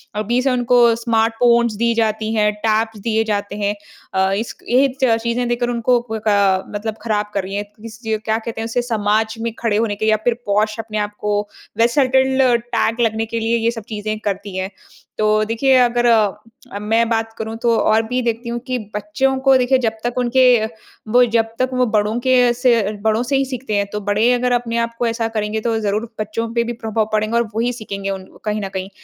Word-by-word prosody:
अभी 235 Hz, +4 st, 0 dB
से 265 Hz, 0 st, +1 dB
उनको 245 Hz, 0 st, +2 dB, 0.2 s
स्मार्ट 225 Hz, -1 st, +1 dB
फ़ोन्स 235 Hz, -2 st, +4 dB
दी 235 Hz, +2 st, +1 dB
जाती 220 Hz, -1 st, 0 dB
हैं, 210 Hz, -1 st, +2 dB, 0.2 s
टैब्स 220 Hz, 0 st, 0 dB
दिए 220 Hz, +1 st, 0 dB
जाते 205 Hz, -2 st, -2 dB
हैं। 205 Hz, 0 st, -1 dB, 0.4 s
अ, 190 Hz, 0 st, +2 dB
इसक 220 Hz, +4 st, -4 dB
ये 260 Hz, +3 st, +4 dB, 0.2 s
च 225 Hz, -3 st, +4 dB
चीज़ें 245 Hz, +1 st, 0 dB
देखकर 240 Hz, 0 st, 0 dB
उनको 240 Hz, +1 st, +2 dB
क 220 Hz, -, -1 dB
का 195 Hz, -2 st, +3 dB
मतलब 215 Hz, +1 st, -3 dB
खराब 210 Hz, -2 st, -1 dB
कर 195 Hz, -2 st, -1 dB
रही 195 Hz, +1 st, -6 dB
हैं। 205 Hz, -, -1 dB, 0.2 s
किस 225 Hz, -1 st, -10 dB
ये 220 Hz, 0 st, 0 dB
क्या 220 Hz, +1 st, -1 dB
कहते 225 Hz, 0 st, -5 dB
हैं 225 Hz, -, -3 dB
उसे, 235 Hz, +2 st, -1 dB
समाज 220 Hz, -1 st, 0 dB
में 230 Hz, -1 st, -2 dB
खड़े 215 Hz, -3 st, +1 dB
होने 220 Hz, -2 st, 0 dB
के 215 Hz, -, -3 dB
लिए 220 Hz, -, +4 dB
या 215 Hz, -, +3 dB
फिर 245 Hz, -, +3 dB
पोश 210 Hz, +1 st, +1 dB
अपने 220 Hz, -1 st, -4 dB
आप 205 Hz, 0 st, -1 dB
को 210 Hz, 0 st, 0 dB, 0.4 s
वेसेलटेन्ड 265 Hz, +2 st, +3 dB, 0.3 s
टैग 230 Hz, +2 st, +1 dB
लगने 225 Hz, 0 st, +1 dB
के 230 Hz, +1 st, -3 dB
लिए 230 Hz, +1 st, +1 dB
ये 230 Hz, +1 st, +1 dB
सब 225 Hz, -3 st, -7 dB
चीज़ें 215 Hz, 0 st, -3 dB
करती 200 Hz, -1 st, -4 dB
हैं। 190 Hz, +1 st, -2 dB, 0.5 s
तो 215 Hz, 0 st, +2 dB
देखिए 260 Hz, +4 st, +2 dB
अगर 240 Hz, 0 st, +2 dB
अ, 225 Hz, +1 st, 0 dB
मैं 225 Hz, +2 st, +1 dB
बात 225 Hz, -1 st, -1 dB
करूँ 220 Hz, 0 st, -5 dB
तो 235 Hz, -1 st, +3 dB
और 220 Hz, +1 st, +3 dB
भी 250 Hz, +1 st, -1 dB
देखती 235 Hz, 0 st, -2 dB
हूँ 240 Hz, 0 st, -3 dB
कि 255 Hz, -1 st, -1 dB, 0.2 s
बच्चों 260 Hz, +6 st, 0 dB
को 270 Hz, -, +6 dB
देखिए 255 Hz, +1 st, +3 dB
जब 225 Hz, -, +1 dB
तक 240 Hz, +1 st, -2 dB
उनके 250 Hz, +1 st, +3 dB, 0.7 s
वो 250 Hz, +2 st, +6 dB
जब 225 Hz, -1 st, +4 dB
तक 255 Hz, 0 st, +1 dB
वो 255 Hz, 0 st, +2 dB
बड़ों 215 Hz, 0 st, 0 dB
के 250 Hz, -1 st, +4 dB
से 235 Hz, -4 st, +2 dB
बड़ों 220 Hz, +1 st, +1 dB
से 275 Hz, +3 st, -1 dB
ही 270 Hz, -, +1 dB
सीखते 255 Hz, -4 st, -4 dB
हैं, 200 Hz, -, +1 dB
तो 210 Hz, -, -4 dB
बड़े 210 Hz, +4 st, +2 dB
अगर 250 Hz, 0 st, 0 dB
अपने 235 Hz, -1 st, 0 dB
आप 230 Hz, 0 st, -1 dB
को 240 Hz, -, +1 dB
ऐसा 230 Hz, 0 st, -1 dB
करेंगे 215 Hz, -1 st, -2 dB
तो 225 Hz, -1 st, +1 dB
ज़रूर 215 Hz, +2 st, -1 dB
बच्चों 215 Hz, +2 st, -2 dB
पे 235 Hz, 0 st, +2 dB
भी 240 Hz, -, -4 dB
प्रभाव 220 Hz, -1 st, -1 dB
पड़ेगा 215 Hz, +2 st, +1 dB
और 235 Hz, -, +3 dB
वही 235 Hz, +2 st, +1 dB
सीखेंगे 200 Hz, -4 st, -5 dB
उन 190 Hz, -1 st, -4 dB, 0.2 s
कहीं 210 Hz, 0 st, -1 dB
न 195 Hz, -, -3 dB
कहीं। 190 Hz, 0 st, -4 dB
225 Hz, 220 wpm, -19 LUFS, 210-240 Hz, 0.7 s, को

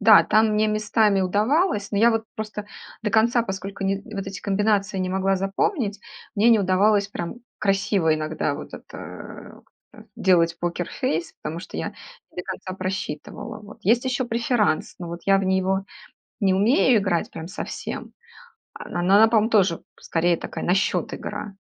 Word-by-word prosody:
Да, 215 Hz, 0 st, +8 dB
там 220 Hz, +1 st, +4 dB
мне 215 Hz, +1 st, +3 dB
местами 215 Hz, -1 st, +2 dB
удавалось, 210 Hz, -, +1 dB
но 200 Hz, -, 0 dB
я 230 Hz, +3 st, +6 dB
вот 225 Hz, -1 st, 0 dB
просто 215 Hz, -1 st, -5 dB, 0.4 s
до 210 Hz, -, 0 dB
конца, 230 Hz, +2 st, +3 dB
поскольку 195 Hz, -1 st, -5 dB
ни 195 Hz, 0 st, +1 dB, 0.2 s
вот 195 Hz, -1 st, -4 dB
эти 195 Hz, 0 st, -6 dB
комбинации 205 Hz, 0 st, +1 dB
не 185 Hz, 0 st, -1 dB
могла 190 Hz, +1 st, +1 dB
запомнить, 200 Hz, -, -1 dB, 0.3 s
мне 215 Hz, +2 st, +4 dB
не 230 Hz, -2 st, +6 dB
удавалось 200 Hz, +2 st, +3 dB
прям 175 Hz, +1 st, -5 dB, 0.2 s
красиво 195 Hz, -5 st, +2 dB
иногда 155 Hz, -1 st, -2 dB
вот -, -, -9 dB
это -, -, -10 dB, 0.3 s
как-то -, -, -15 dB
делать 170 Hz, -2 st, +3 dB
покерфейс, 175 Hz, -, -2 dB
потому 165 Hz, +2 st, -4 dB
что -, -, -9 dB
я -, -, -2 dB, 0.4 s
не -, -, -26 dB
до 180 Hz, -, -3 dB
конца 190 Hz, 0 st, -6 dB
просчитывала, 190 Hz, +3 st, -5 dB
вот. 210 Hz, +1 st, -13 dB
Есть 230 Hz, +5 st, +3 dB
ещё 255 Hz, 0 st, 0 dB
преферанс, 235 Hz, -6 st, 0 dB
но 175 Hz, -, -6 dB
вот 170 Hz, +1 st, -6 dB
я 195 Hz, 0 st, +5 dB
в 195 Hz, -, -1 dB
него 190 Hz, +1 st, +1 dB, 0.6 s
не 195 Hz, -4 st, +3 dB
умею 225 Hz, +4 st, +4 dB
играть 185 Hz, -4 st, 0 dB
прям 160 Hz, -, -7 dB
совсем, 190 Hz, -, -6 dB, 0.6 s
а, -, -, -9 dB
но 175 Hz, -, -3 dB
она, 190 Hz, +3 st, +5 dB
на 220 Hz, -, +8 dB
пом 225 Hz, 0 st, +3 dB
тоже 195 Hz, -6 st, +3 dB, 0.2 s
скорее 170 Hz, 0 st, +1 dB
такая -, -, -6 dB
на 180 Hz, -, +2 dB
счёт 195 Hz, +2 st, 0 dB
игра. 200 Hz, -2 st, -6 dB
200 Hz, 170 wpm, -24 LUFS, 185-215 Hz, 0.6 s, Да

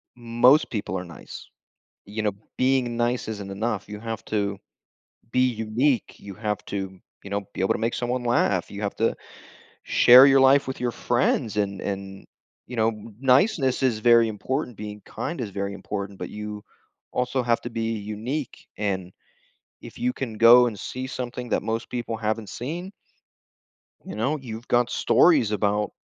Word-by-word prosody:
most 120 Hz, +5 st, +4 dB
people 100 Hz, -4 st, -3 dB
are 90 Hz, -, -4 dB
nice, 85 Hz, -2 st, -11 dB, 0.6 s
you 105 Hz, +2 st, -4 dB
know? 105 Hz, -2 st, +1 dB, 0.2 s
Being 130 Hz, -2 st, +1 dB
nice 120 Hz, +1 st, 0 dB
isn't 105 Hz, -3 st, -5 dB
enough. 105 Hz, 0 st, -2 dB
You 105 Hz, 0 st, -7 dB
have 115 Hz, -1 st, -5 dB
to 100 Hz, -2 st, -1 dB, 0.7 s
be 130 Hz, 0 st, +4 dB
unique, 115 Hz, +3 st, 0 dB
you 100 Hz, -1 st, -10 dB
have 105 Hz, 0 st, -3 dB
to, 95 Hz, -2 st, -5 dB, 0.3 s
you 100 Hz, -, -9 dB
know, 100 Hz, 0 st, -1 dB
be -, -, -6 dB
able 95 Hz, -, +2 dB
to -, -, -2 dB
make 115 Hz, +1 st, 0 dB
someone 125 Hz, 0 st, -2 dB
laugh, 105 Hz, -6 st, +1 dB
you 100 Hz, -, -7 dB
have 100 Hz, -, -3 dB
to 115 Hz, -, +1 dB, 0.7 s
share 125 Hz, +3 st, +8 dB
your 135 Hz, -1 st, +6 dB
life 135 Hz, +1 st, +5 dB
with 130 Hz, -, -5 dB
your 125 Hz, -, 0 dB
friends, 120 Hz, -2 st, 0 dB
and 100 Hz, -2 st, -1 dB
and 95 Hz, -1 st, -5 dB, 0.4 s
you 125 Hz, -, -8 dB
know, 110 Hz, 0 st, +3 dB, 0.3 s
niceness 135 Hz, -, +3 dB
is 115 Hz, -4 st, +2 dB
very 115 Hz, 0 st, +6 dB
important. 125 Hz, +3 st, -3 dB
Being 105 Hz, 0 st, -7 dB
kind 170 Hz, -, -5 dB
is 110 Hz, -4 st, -4 dB
very 100 Hz, 0 st, -3 dB
important, 100 Hz, 0 st, -5 dB
but -, -, -6 dB
you 105 Hz, 0 st, -7 dB, 0.5 s
also 125 Hz, +1 st, 0 dB
have 115 Hz, -1 st, +2 dB
to 120 Hz, -, -5 dB
be 115 Hz, 0 st, -2 dB
unique, 110 Hz, +7 st, -5 dB
and 95 Hz, -3 st, -2 dB, 0.7 s
if -, -, -11 dB
you 250 Hz, +1 st, 0 dB
can 120 Hz, -, -5 dB
go 120 Hz, +2 st, +8 dB
and 110 Hz, -4 st, -4 dB
see 130 Hz, +8 st, -5 dB
something 125 Hz, -1 st, -5 dB
that -, -, +1 dB
most 115 Hz, +2 st, -3 dB
people 120 Hz, -2 st, -3 dB
haven't 110 Hz, -1 st, -2 dB
seen 170 Hz, +10 st, -5 dB, 1.1 s
you -, -, -7 dB
know, 135 Hz, +8 st, 0 dB
you've 120 Hz, -3 st, -8 dB
got 120 Hz, 0 st, +2 dB
stories 145 Hz, -8 st, +4 dB
about, 105 Hz, 0 st, 0 dB
115 Hz, 170 wpm, -25 LUFS, 105-125 Hz, 1.1 s, share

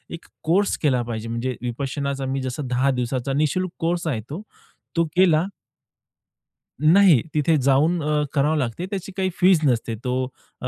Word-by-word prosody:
एक 165 Hz, -, -14 dB, 0.2 s
कोर्स 195 Hz, +5 st, +2 dB
केला 130 Hz, -5 st, +2 dB
पाहिजे, 115 Hz, -1 st, -5 dB
म्हणजे 120 Hz, +2 st, -2 dB
विपश्यनाचा 135 Hz, +3 st, -3 dB
मी 135 Hz, +1 st, -2 dB
जसं 130 Hz, +2 st, -4 dB
10 125 Hz, +2 st, +1 dB
दिवसाचा 125 Hz, +2 st, -2 dB
निःशुल्क 155 Hz, +6 st, 0 dB
कोर्स 170 Hz, +1 st, -1 dB
आहे 125 Hz, -8 st, -1 dB
तो, 155 Hz, +7 st, -5 dB, 0.5 s
तो 170 Hz, 0 st, +2 dB
केला 175 Hz, -3 st, +4 dB, 1.3 s
नाही. 165 Hz, -, +6 dB
तिथे 155 Hz, +2 st, +2 dB
जाऊन 145 Hz, +6 st, +2 dB
अ, 150 Hz, 0 st, +1 dB
करावं 150 Hz, +2 st, +2 dB
लागते. 130 Hz, +4 st, -2 dB
त्याची 195 Hz, 0 st, -5 dB
काही 190 Hz, -1 st, +1 dB
फीस 185 Hz, -2 st, +5 dB
नसते. 120 Hz, -4 st, +1 dB
तो 130 Hz, 0 st, -1 dB, 0.4 s
अ, -, -, -3 dB
145 Hz, 155 wpm, -23 LUFS, 130-170 Hz, 1.3 s, नाही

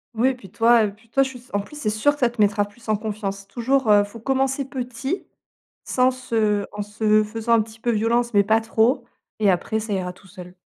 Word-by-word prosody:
Oui, 255 Hz, +3 st, +2 dB
puis 195 Hz, -7 st, -14 dB
toi 230 Hz, +1 st, +4 dB
et 205 Hz, -, -1 dB
puis 225 Hz, +2 st, -23 dB
toi, 270 Hz, +3 st, +3 dB
je 265 Hz, -, -3 dB
suis 255 Hz, -, -10 dB
s 250 Hz, +2 st, -21 dB
en 205 Hz, -, +2 dB
plus 205 Hz, +9 st, -9 dB
c'est 295 Hz, -8 st, -2 dB
sûr 215 Hz, +7 st, +2 dB
que 295 Hz, -, -13 dB
ça 245 Hz, -2 st, +3 dB
te 235 Hz, -, -16 dB
mettra 205 Hz, 0 st, +3 dB
plus 220 Hz, +3 st, -18 dB
en 215 Hz, -, +2 dB
confiance. 200 Hz, -2 st, -5 dB
Toujours, 260 Hz, 0 st, 0 dB
heu, 205 Hz, 0 st, +6 dB
faut 205 Hz, +3 st, -10 dB
commencer 270 Hz, +2 st, 0 dB
petit 265 Hz, +4 st, -4 dB, 0.6 s
sans 255 Hz, 0 st, +3 dB
se 220 Hz, -5 st, 0 dB
en 205 Hz, -, -4 dB
se 215 Hz, +1 st, +2 dB
faisant 225 Hz, +2 st, -1 dB
un 230 Hz, -, +5 dB
petit 220 Hz, +1 st, -15 dB
peu 240 Hz, -, -2 dB
violence, 235 Hz, +2 st, +1 dB
mais 200 Hz, -, +6 dB
pas 220 Hz, +2 st, +3 dB
trop. 225 Hz, +3 st, +1 dB, 0.3 s
Et 210 Hz, -2 st, +3 dB
après 190 Hz, +4 st, 0 dB
ça 215 Hz, -1 st, -6 dB
ira 180 Hz, -1 st, -2 dB
tout 195 Hz, -, -19 dB
seul. 180 Hz, 0 st, -12 dB
225 Hz, 240 wpm, -23 LUFS, 205-250 Hz, 0.6 s, heu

